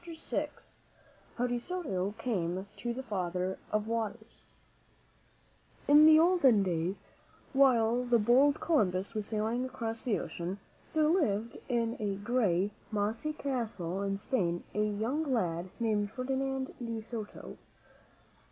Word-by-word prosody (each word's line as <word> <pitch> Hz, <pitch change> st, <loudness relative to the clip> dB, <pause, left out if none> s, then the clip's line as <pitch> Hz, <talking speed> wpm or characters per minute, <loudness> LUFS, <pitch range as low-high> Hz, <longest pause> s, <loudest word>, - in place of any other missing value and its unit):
m -, -, -18 dB
,iM: -, -, -2 dB, 0.9 s
HOW 245 Hz, -, +1 dB
DE 245 Hz, -1 st, -1 dB
SOTO 225 Hz, -, -3 dB
CAME 190 Hz, -6 st, -2 dB
TO 235 Hz, +4 st, -3 dB
THE 260 Hz, +3 st, -4 dB
FATHER 185 Hz, -4 st, -2 dB
OF 215 Hz, 0 st, +1 dB
WATERS 225 Hz, 0 st, -4 dB, 1.4 s
I -, -, +2 dB
N 300 Hz, +1 st, +9 dB
the 310 Hz, 0 st, +8 dB
olden 315 Hz, -, +5 dB
days, 175 Hz, +1 st, -2 dB, 0.5 s
while 250 Hz, -3 st, +4 dB
the 245 Hz, -1 st, +3 dB
bold 255 Hz, +6 st, +4 dB
Columbus 200 Hz, -, +1 dB
was 215 Hz, -2 st, -3 dB
sailing 220 Hz, +3 st, -1 dB
across 230 Hz, -3 st, -4 dB
the 235 Hz, -5 st, 0 dB
ocean, 175 Hz, +3 st, -4 dB, 0.4 s
there 310 Hz, -1 st, +4 dB
lived 235 Hz, -, +1 dB
in 235 Hz, -1 st, 0 dB
a 205 Hz, -2 st, -1 dB
gray, 205 Hz, -3 st, +1 dB, 0.2 s
mossy 220 Hz, +8 st, -1 dB
castle 225 Hz, -, -3 dB
in 195 Hz, 0 st, -1 dB
Spain 180 Hz, -6 st, -1 dB
a 210 Hz, -, +1 dB
young 230 Hz, +9 st, -1 dB
lad 180 Hz, -6 st, 0 dB
named 210 Hz, -3 st, +1 dB
Ferdinand 265 Hz, +2 st, -2 dB
de 230 Hz, -1 st, -3 dB
Soto. 220 Hz, -1 st, -8 dB
225 Hz, 135 wpm, -31 LUFS, 200-255 Hz, 1.4 s, N